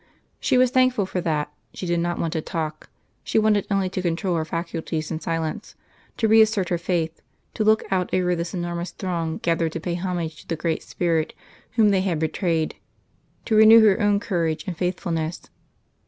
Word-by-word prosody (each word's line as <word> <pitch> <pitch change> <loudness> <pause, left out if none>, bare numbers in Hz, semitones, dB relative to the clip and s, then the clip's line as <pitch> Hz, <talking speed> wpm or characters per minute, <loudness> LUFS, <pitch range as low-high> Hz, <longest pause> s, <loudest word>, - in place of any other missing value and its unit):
She 260 - +2
was 250 -1 +4
thankful 255 -5 +3
for 185 -1 -3
that: 150 -3 -1 0.2
she - - -5
did 170 -1 0
not 175 0 -1
want 165 - -2
to 160 - -1
talk; 155 -2 -5 0.3
she - - -1
wanted 215 -2 +3
only 195 -2 +1
to 185 - -2
control 175 +1 -1
her 160 - 0
faculties 165 -1 -4
in 160 - -2
silence, 165 +5 -3 0.4
to 225 - +2
reassert 220 -3 +4
her 175 - 0
faith, 165 -2 -2 0.3
to 215 - -1
look 215 0 +4
out 185 -2 0
over 180 -1 +1
this 170 +2 -4
enormous 175 0 -3
throng 170 -4 -3
gathered 165 -1 +1
to - - -3
pay 175 +1 -3
homage 170 -3 -3
to - - -22
the 165 - -1
great 160 0 -2
Spirit 165 -3 -1 0.4
whom 220 -2 +4
they 195 -2 +3
had 185 -4 0
betrayed, 160 0 -1 0.7
to 220 - +1
renew 220 +1 +8
her 210 +2 +4
own 205 -1 +3
courage 170 -7 -1
and 185 -3 -4
faithfulness. 170 -2 -2
175 Hz, 185 wpm, -23 LUFS, 165-200 Hz, 0.7 s, renew